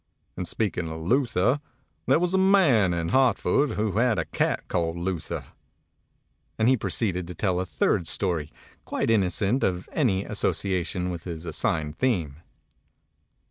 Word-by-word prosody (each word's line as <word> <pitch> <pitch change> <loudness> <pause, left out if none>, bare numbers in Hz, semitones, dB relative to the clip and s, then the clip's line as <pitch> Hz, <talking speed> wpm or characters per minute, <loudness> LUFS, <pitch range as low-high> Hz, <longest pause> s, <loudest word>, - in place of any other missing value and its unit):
And 90 - -4
speaking 90 -4 -2
of 80 0 -6
Luther, 125 - +1 0.5
there - - +5
was 175 +2 0
a - - +3
man 170 - +4
in 85 -1 -1
Hartford 130 +2 +2
who 105 0 -1
had 120 -3 +2
a - - -1
cat - - -1
called 85 -1 -1
Luther," 85 -1 -3 1.1
and 110 - +2
he 130 - +5
proceeded 95 -4 -1
to 90 - -8
tell 90 0 0
a 95 - -3
third 85 - 0
story, 80 -4 0 0.3
quite - - -2
inno 100 +2 +2
t - - +3
of 90 -1 -4
any 100 -10 +1
association 90 -1 -1
with 85 -1 -7
his 85 -2 -6
assigned 80 -2 -2
theme. 85 - 0
95 Hz, 150 wpm, -26 LUFS, 85-120 Hz, 1.1 s, there